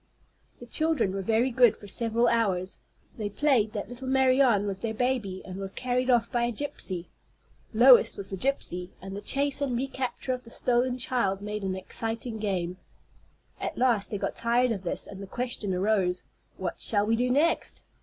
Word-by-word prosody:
The - - -11
children 315 -11 +1
were 195 - -2
very 225 +6 +1
good 245 -2 +5
for 205 - -12
several 230 +3 +1
hours. 190 -5 0 0.4
They 210 -1 -2
played 230 -2 +2
that 205 - -4
little 245 +2 -8
Marianne 260 -5 +4
was 195 -2 -3
their 220 +1 -3
baby, 230 -6 -1
and 185 -1 -7
was 195 -1 -4
carried 250 +2 -1
off 240 -2 +3
by 240 -1 +1
a 240 - -1
gypsy. 205 -8 -3 0.7
Lois 245 +2 +6
was 195 0 -7
the - - -2
gypsy, 180 -6 -1
and 195 +1 -8
the 200 - -5
chase 280 +5 +1
and 260 -4 0
recapture 265 0 -3
of 250 0 -5
the 230 - -13
stolen 245 +1 +1
child 240 -8 0
made 210 +1 -4
an 190 -1 -1
exciting 225 +4 -4
game. 185 -4 -2 0.8
At - - -4
last 240 -5 +2
they 205 - -3
got - - -3
tired 240 +1 +2
of 200 -4 -2
this, 180 - -1
and 195 -1 -9
the 195 - -7
question 240 -2 -3
arose: 185 -1 +1 0.3
"What 180 -3 -4
shall 205 -2 +2
we 225 +2 +2
do 250 +2 0
next?" 290 +6 +1
230 Hz, 185 wpm, -27 LUFS, 195-255 Hz, 0.8 s, Lois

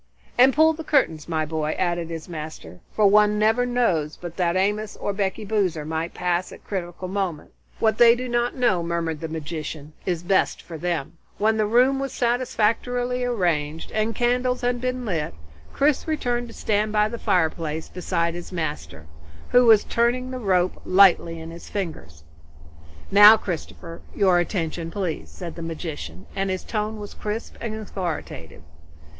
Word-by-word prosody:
"And 255 +2 +6
pull 315 +4 +4
the 320 +1 -7
curtains, 170 - +1
my 160 -1 0
boy," 155 0 -2
added 175 -2 -1
his 165 -1 -6
master, 155 - -8
"for 215 - +2
one 210 +1 +5
never 220 +4 +2
knows 180 -12 0
but 175 -1 -8
that 175 -2 +1
Amos 205 +3 0
or 205 - -2
Becky 200 +2 -2
Boozer 190 -7 0
might 160 +2 -3
pass 180 0 0
by - - -10
at - - -19
the - - -29
crucial 185 -2 -4
moment. 185 -5 -3 0.3
What 220 -1 +1
they 235 -1 +8
do 255 +1 -4
not 240 0 0
know," 240 -9 +2
murmured 170 -2 -2
the 160 - -4
magician, 155 -1 -6
"is 175 -3 -2
best 190 +2 +1
for 170 - -10
them." 170 -1 -3 0.2
When 220 +1 +2
the 215 -1 +2
room 255 +5 +4
was 275 0 -3
satisfactorily 245 +1 0
arranged, 165 -10 -1
and 215 +1 -1
candles 250 +1 +1
had 245 0 0
been 255 0 -2
lit, 160 - -2 0.4
Chris 290 +2 +1
returned 245 -6 -1
to 230 - -11
stand 215 0 0
by 210 0 +3
the 235 +1 -6
fireplace 160 -2 0
beside 170 -2 -1
his 175 +2 -8
master, 145 - -5 0.4
who 245 -1 +5
was 220 -2 +7
turning 245 +2 0
the 255 - -4
rope 185 -5 +1
lightly 185 -3 +4
in 160 +1 -8
his 170 +1 -11
fingers. 155 - -5 0.9
"Now 205 +2 +9
Christopher, 170 -3 -6
your 185 -4 +4
attention 165 -2 -2
please," 180 -3 -4
said 175 -3 -7
the 170 - -8
magician, 155 - -6
and 195 0 -1
his 185 -1 -2
tone 215 0 -3
was 205 -1 -8
crisp 210 +2 -5
and 225 -2 -3
authoritative. 175 - -6
190 Hz, 170 wpm, -24 LUFS, 165-230 Hz, 0.9 s, Now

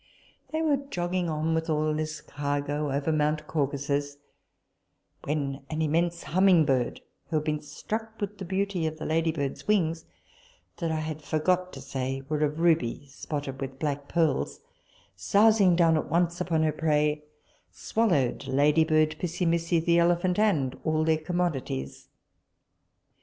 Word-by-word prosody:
They 320 0 -1
were 295 -3 +3
jogging 180 -10 -2
on 155 +1 0
with 160 0 -1
all 155 0 +1
this 155 0 -3
cargo 145 0 -2
over 140 +3 0
mount 150 0 0
Caucasus, 145 -1 -1 1.1
when 140 -2 -2
an 160 0 -1
immense 170 +2 0
humming 180 -2 +4
bird, 130 -4 0 0.3
who 165 - -2
had 155 0 0
been 150 -1 -1
struck 220 +9 -6
with 205 -1 -4
the 190 - -5
beauty 190 -2 -1
of 155 0 -5
the 155 - -6
ladybird's 160 -3 -1
wings, 165 -6 +1 0.7
that 165 -3 -2
I 155 -1 -1
had 155 0 -5
forgot 180 +5 0
to 135 - -8
say 135 0 -3
were 150 0 -1
of 150 +1 -1
ruby 155 -6 +2
spotted 140 -1 -5
with 135 -1 -5
black 145 -1 -3
pearls, 160 -5 0 0.5
sousing 200 - +4
down 165 -2 +4
at 155 - -1
once 170 +2 +1
upon 165 -3 +1
her 155 - +2
prey, 150 -1 +1 0.5
swallowed 145 - 0
ladybird, 155 +3 +3
Pissimissi, 170 -1 0
the 170 +1 +3
elephant, 175 +2 +2
and 150 -12 +2
all 155 -1 +1
their 160 0 +2
commodities. 155 - -3
155 Hz, 145 wpm, -27 LUFS, 145-175 Hz, 1.1 s, humming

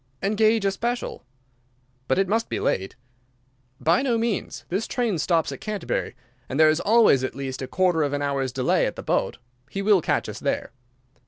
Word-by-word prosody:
"Engage 215 +1 +2
a 195 - +3
special." 240 +5 -3 0.8
"But 130 - +2
it 195 0 +2
must 225 +4 0
be - - -2
late." 95 +1 -1 0.8
"By 170 +8 +3
no 250 -4 +1
means. 225 -3 -2
This 195 +5 -1
train 230 -9 -1
stops 165 0 +1
at - - -8
Canterbury; 215 -2 -3 0.3
and 135 - -2
there 155 -1 +7
is 155 - 0
always 215 - +4
at 130 - -3
least 135 -1 -5
a 130 - -4
quarter 180 -1 +2
of 145 -2 +1
an 145 0 -1
hour's 135 -2 -1
delay 125 0 +1
at - - -4
the - - -7
boat. - - 0 0.3
He 195 - -4
will 200 -3 +4
catch - - 0
us - - -6
there." - - -2
185 Hz, 190 wpm, -24 LUFS, 140-215 Hz, 0.8 s, there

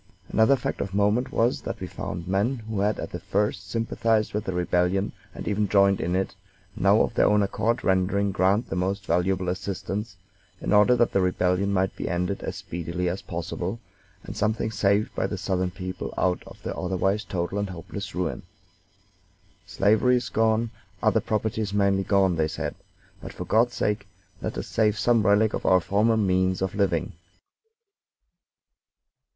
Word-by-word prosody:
Another 110 +6 +4
fact 125 - -3
of 100 0 -4
moment 105 +5 +2
was 120 +2 +1
that - - -5
we - - -4
found 85 +1 -6
men 100 +8 +1
who 110 -3 -3
had 105 +2 +1
at - - -5
the - - -5
first 100 -2 -1
sympathized 115 0 0
with 105 +1 -2
the 95 - -2
rebellion, 90 +2 +1 0.2
and - - -7
even 105 -1 0
joined 100 -1 +4
in 90 +2 -1
it, 95 0 -1 0.4
now 100 +3 +4
of - - 0
their - - +4
own 105 0 +4
accord 115 +5 0
rendering 100 +2 +2
Grant 100 +4 +2
the - - -1
most 95 +2 -1
valuable 90 +2 +1
assistance, 95 +3 -3 0.4
in - - -1
order 105 +4 +6
that 120 -1 +2
the 100 - +2
rebellion 90 +2 +1
might 95 -1 0
be - - -4
ended 90 +2 -1
as - - -4
speedily 85 +1 -4
as 90 +3 -4
possible, 85 +4 -4 0.4
and 100 - -8
something 110 +1 0
saved 100 0 +1
by - - -1
the 100 - -4
Southern 95 -1 -1
people 90 0 -6
out 90 -1 +1
of - - -13
the - - -4
otherwise 95 +3 0
total 90 +1 -3
and 100 -1 -2
hopeless 85 -3 -7
ruin. - - -2 1.3
"Slavery 110 +7 +3
is 125 0 -1
gone, 110 +1 +1 0.3
other - - +3
property 110 0 -1
is 100 -1 -3
mainly 100 -1 +2
gone," 95 -4 +3
they 80 -1 +2
said, 80 - -4 0.5
"but, - - -8
for - - -6
God's 115 +2 +2
sake, 105 -1 -1 0.3
let - - -4
us - - -3
save 110 -1 +1
some 115 +3 +3
relic 105 +2 +3
of - - -3
our 95 - +5
former 105 +5 +2
means 95 -2 +1
of 95 - -2
living." 95 -5 0
100 Hz, 175 wpm, -25 LUFS, 95-105 Hz, 1.3 s, order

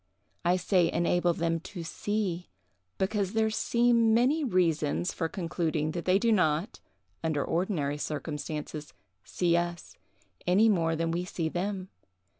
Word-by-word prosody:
I 175 +1 +3
say 180 -2 +2
enable 175 +1 +2
them 165 0 0
to 175 0 -8
see, 185 0 -2 0.5
because 195 0 0
there 220 0 +2
seem 235 0 +3
many 270 +7 +3
reasons 175 - +1
for 165 -2 -2
concluding 160 -4 -1
that 170 +1 -5
they 185 +1 +4
do 230 +3 +2
not, 180 0 +1 0.4
under 155 -3 0
ordinary 160 -5 -1
circumstances, 150 0 -5 0.3
see 170 +8 +1
us, 175 0 -3 0.5
any 200 +5 +5
more 165 -5 +2
than 165 +1 -1
we 175 +2 -1
see 170 -3 -3
them. 185 +2 -3
175 Hz, 135 wpm, -29 LUFS, 165-200 Hz, 0.5 s, any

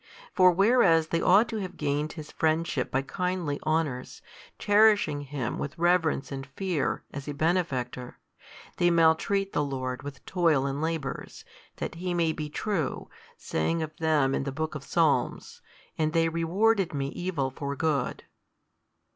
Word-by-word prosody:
For 185 -2 +6
whereas 180 -5 +4
they 165 - 0
ought 205 +5 +5
to 225 - -3
have 185 -3 -6
gained 150 +1 -1
His 155 -3 -9
friendship 160 -4 0
by 135 +1 0
kindly 180 -2 -2
honours, 155 -5 -2 0.3
cherishing 205 -8 +4
Him 140 -4 -4
with 145 +3 -5
reverence 170 -4 +1
and 135 -1 -4
fear, 165 +2 -2
as 140 0 -7
a 145 - -4
Benefactor, 140 -7 -1 0.6
they 175 - +3
maltreat 170 +4 +2
the 145 - +1
Lord 130 -2 -3
with 140 -2 -9
toil 165 -7 +2
and 140 +1 -2
labours, 160 -3 -4 0.3
that - - -4
He 175 +1 -3
may 165 -2 +2
be 155 -1 -5
true, 180 -1 -3 0.3
saying 160 - -1
of 155 0 -7
them 150 -4 +2
in - - 0
the 140 - -3
book 155 +3 -3
of 150 -3 -6
Psalms, 150 -5 0 0.4
And 155 0 +1
they 165 -1 +3
rewarded 180 +3 +1
Me 135 -1 -2
evil 160 -6 -2
for 140 0 -4
good. 145 -3 -1
160 Hz, 155 wpm, -27 LUFS, 140-175 Hz, 0.6 s, For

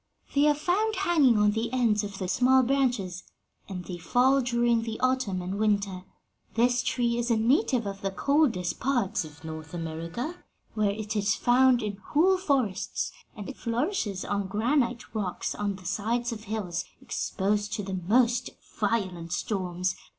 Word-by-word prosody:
They 290 +1 +4
are 295 - +4
found 395 +8 0
hanging 325 - +4
on 210 0 +4
the 225 +2 -2
ends 230 -5 +2
of 200 -1 -6
the 185 - -3
small 255 +6 +4
branches, 240 -9 0 0.5
and 180 -2 -6
they 175 -2 -6
fall 260 +9 +3
during 240 -1 +2
the 225 -1 -5
autumn 255 -8 0
and 190 +3 -4
winter. 200 -3 0 0.5
This 245 +1 +3
tree 240 -2 0
is 240 +1 -1
a 230 - +3
native 250 - +2
of 195 0 -5
the 195 - -1
coldest 235 - +1
parts 245 -10 0
of 150 0 -14
North 160 +1 -7
America, 165 - -5 0.3
where 215 -2 +1
it 215 +1 -4
is 205 -1 +2
found 250 0 +4
in 205 -2 -3
whole 350 - +2
forests, 265 - 0 0.2
and 205 -3 -7
it 275 - -7
flourishes 230 - -1
on 200 -1 -1
granite 235 +4 0
rocks 200 -5 -2
on 205 -1 -2
the 185 -1 -14
sides 230 +6 -1
of 220 -1 -7
hills 195 -5 -3 0.2
exposed 205 +1 -1
to 215 -3 -2
the 190 -1 -4
most 240 +2 +3 0.3
violent 185 -6 -1
storms. 185 -2 -1
220 Hz, 165 wpm, -27 LUFS, 195-250 Hz, 0.5 s, They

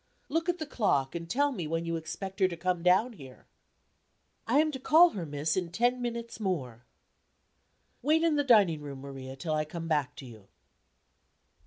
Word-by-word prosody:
"Look 330 +4 -1
at 355 - +1
the 315 - -4
clock, 195 - 0
and 170 -1 -6
tell 285 +6 +2
me 180 - -4
when 165 +1 -2
you 165 0 -2
expect 190 +5 -6
her 190 - +5
to 170 -2 -6
come 180 0 -1
down 190 +8 +3
here." 135 - -13 1.0
"I 240 +5 +3
am 310 +1 +3
to 265 - -6
call 330 +6 +6
her, 175 -5 -5
miss, 145 +2 -1
in 180 -3 -2
ten 245 +5 +1
minutes 235 -1 -5
more." 130 - -3 1.1
"Wait 310 +5 +2
in 330 -2 +3
the 290 - +2
dining 200 - +4
room, 140 -2 -8
Maria, 135 -1 -8
till 155 +3 -3
I 155 0 +1
come 165 +2 -7
back 150 -4 0
to 135 - -10
you." 110 -5 -13
180 Hz, 190 wpm, -29 LUFS, 150-245 Hz, 1.1 s, call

